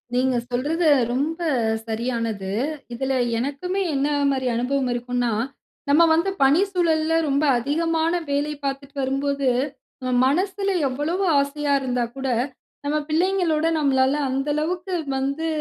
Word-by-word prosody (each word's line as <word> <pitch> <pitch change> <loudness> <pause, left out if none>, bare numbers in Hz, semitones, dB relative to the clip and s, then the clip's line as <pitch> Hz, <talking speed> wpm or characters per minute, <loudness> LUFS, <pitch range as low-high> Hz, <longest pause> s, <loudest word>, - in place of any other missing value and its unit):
நீங்க 255 0 +2
சொல்றது 305 +7 0 0.3
ரொம்ப 310 +6 -1 0.5
சரியானது. 225 -4 -2 0.4
இதுல 265 +2 -1 0.2
எனக்குமே 290 +10 -2
என்ன 275 +2 +1 0.2
மாரி 260 -2 0
அனுபவம் 255 +2 0
இருக்குன்னா, 245 0 -1 0.6
நம்ம 310 +4 +6
வந்து 335 +4 +2
பணி 290 +7 +5
சூழல்ல 325 -3 +1
ரொம்ப 280 +2 +1
அதிகமான 325 +5 0 0.2
வேலை 290 +2 0
பார்த்துட்டு 275 +1 -4
வரும்போது, 275 +1 -1 0.8
மனசுல 385 +7 +1 0.2
எவ்வளவு 300 +9 -1 0.2
ஆசையா 285 +1 0
இருந்தா 250 -2 0
கூட, 270 0 -3 0.6
நம்ம 300 +1 +1
பிள்ளைங்களோடு 330 -1 +2
நம்மளால 265 -1 +3 0.2
அந்த 270 +2 -1
அளவுக்கு 355 +4 -2 0.2
வந்து, 280 +5 -1
280 Hz, 115 wpm, -23 LUFS, 260-325 Hz, 0.8 s, நம்ம